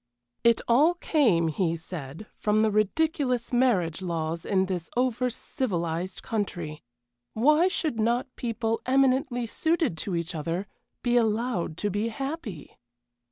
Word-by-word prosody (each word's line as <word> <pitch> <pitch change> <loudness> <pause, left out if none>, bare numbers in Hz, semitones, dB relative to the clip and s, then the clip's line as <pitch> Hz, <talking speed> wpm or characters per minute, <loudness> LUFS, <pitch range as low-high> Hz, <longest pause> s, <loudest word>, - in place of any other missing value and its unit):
It 235 -1 +4
all 295 +9 +5
came, 230 - +2
he 165 +1 0
said, 160 +1 -8
from 215 +1 +2
the 220 - +3
ridiculous 250 - +1
marriage 195 -10 +2
laws 165 -2 -3
in 190 -2 +2
this 180 -3 -4
over 250 0 +1
civilized 180 -8 -3
country. 175 -8 -3 0.5
Why 300 +9 +5
should 310 -10 -1
not 240 +3 0
people 230 -1 -2
eminently 260 -2 +2
suited 320 - 0
to 185 +1 -2
each 170 +1 -3
other 165 +4 -2 0.4
be 245 0 +3
allowed 220 -7 0
to 205 +1 -1
be 205 +4 0
happy? 255 - -6
220 Hz, 130 wpm, -27 LUFS, 175-255 Hz, 0.5 s, all